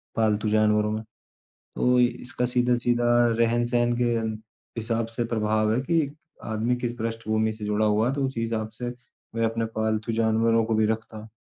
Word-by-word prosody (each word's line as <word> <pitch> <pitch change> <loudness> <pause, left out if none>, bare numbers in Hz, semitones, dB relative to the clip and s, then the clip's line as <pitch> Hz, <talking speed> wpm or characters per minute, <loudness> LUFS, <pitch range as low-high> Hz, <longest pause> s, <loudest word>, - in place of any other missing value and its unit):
पालतू 110 -1 +1
जानवरों 105 0 +3
में। 110 0 -2 0.5
तो 125 0 0
इसका 125 0 -1
सीधा-सीधा 120 -1 +1 0.3
रहन-सहन 120 +1 +2
के - - +3 0.8
हिसाब 115 0 -1
से 120 - 0
प्रभाव 110 -1 +1
है, 125 - +1
कि 150 -1 0 0.3
आदमी 110 +3 0
किस 120 -1 -3
पृष्ठभूमि 110 -1 -1
से 110 0 -8
जुड़ा 105 +1 +1
हुआ 105 +3 +2
है 135 - -1
तो 140 -1 -1
उसी 130 -3 -4
हिसाब 110 -1 -2
से 120 0 -2 0.4
वह 115 0 0
अपने 115 0 -2
पालतू 110 +1 -1
जानवरों 115 0 +2
को 110 0 -1
भी 110 0 +3
रखता। 110 0 -4
115 Hz, 165 wpm, -25 LUFS, 110-120 Hz, 0.8 s, जानवरों